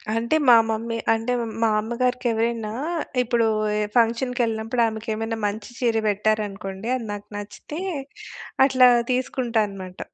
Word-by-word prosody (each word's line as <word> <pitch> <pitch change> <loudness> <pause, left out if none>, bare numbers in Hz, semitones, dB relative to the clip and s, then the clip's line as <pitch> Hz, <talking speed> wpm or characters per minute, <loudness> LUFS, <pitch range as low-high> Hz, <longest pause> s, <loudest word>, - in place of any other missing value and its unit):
అంటే, 235 +6 +1
మా 245 - +9
మమ్మీ 230 +1 -2 0.2
అంటే, 225 +2 -2 0.3
మా 225 - +4
అమ్మగారికి 250 +3 -1
ఎవరైనా 225 -1 -1 0.5
ఇప్పుడు 235 -1 +1 0.5
ఫంక్షన్‌కి 240 +2 +2
కెళ్ళినప్పుడు, 225 +1 0
ఆమెకు 220 0 -5
ఏమైనా 225 +1 -3
మంచి 205 +1 -5
చీర 235 -3 +1
పెట్టారు 215 +1 +1
అనుకోండి, 195 +1 -7
అది 245 -3 -4
నాకు 205 0 -8
నచ్చితే, 205 +9 -7 0.9
అట్లా 255 -2 +6 0.2
తీసుకుంటా 250 -2 0
అన్నమాట. 185 -2 -9
225 Hz, 130 wpm, -23 LUFS, 215-240 Hz, 0.9 s, మా